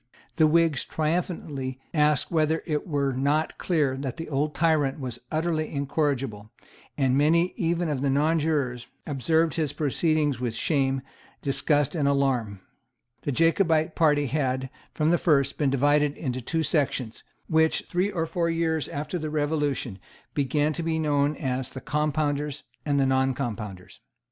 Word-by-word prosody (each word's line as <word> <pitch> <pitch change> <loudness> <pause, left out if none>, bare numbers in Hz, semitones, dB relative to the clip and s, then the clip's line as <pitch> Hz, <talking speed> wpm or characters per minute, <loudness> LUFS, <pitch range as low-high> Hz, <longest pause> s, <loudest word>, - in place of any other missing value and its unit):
The 160 -2 +6
Whigs 160 -3 +3
triumphantly 155 -5 -2
asked 150 -3 +2
whether 160 -1 +1
it 150 -2 -2
were 140 -4 0
not 145 +5 0
clear 150 -7 +1
that 135 0 -4
the 165 -1 -6
old 150 +1 -1
tyrant 155 -4 +2
was 130 -3 -5
utterly 155 0 -1
incorrigible; 135 -7 -1 0.5
and 130 -2 +2
many 165 +5 +3
even 170 -3 0
of 145 -4 -2
the 140 - +1
nonjurors 145 -4 +1 0.2
observed 160 +3 +1
his 155 -3 0
proceedings 150 -2 +1
with 120 -2 -2
shame, 135 -1 0 0.4
disgust 145 0 +1
and 150 -5 +1
alarm. 130 -8 0 0.6
The 145 - -2
Jacobite 165 +1 +2
party 150 -3 +3
had, 130 -2 -1 0.2
from 155 +1 +1
the 175 - +3
first, 140 -4 +2
been 145 -3 +2
divided 145 +2 +2
into 130 -3 -3
two 160 +6 -1
sections, 135 -7 -1 0.2
which, 160 0 +2
three 185 +3 0
or 170 -5 -1
four 170 +1 -1
years 165 -3 0
after 150 +5 -4
the 155 -1 -3
Revolution, 145 -8 -1 0.3
began 145 +2 +1
to 170 - -3
be 160 -1 -1
known 145 -1 +1
as 130 -2 -2
the 130 - -7
Compounders 150 0 -1 0.2
and 140 -1 +2
the 135 - +3
Noncompounders. 120 -8 -2
150 Hz, 150 wpm, -26 LUFS, 135-160 Hz, 0.6 s, The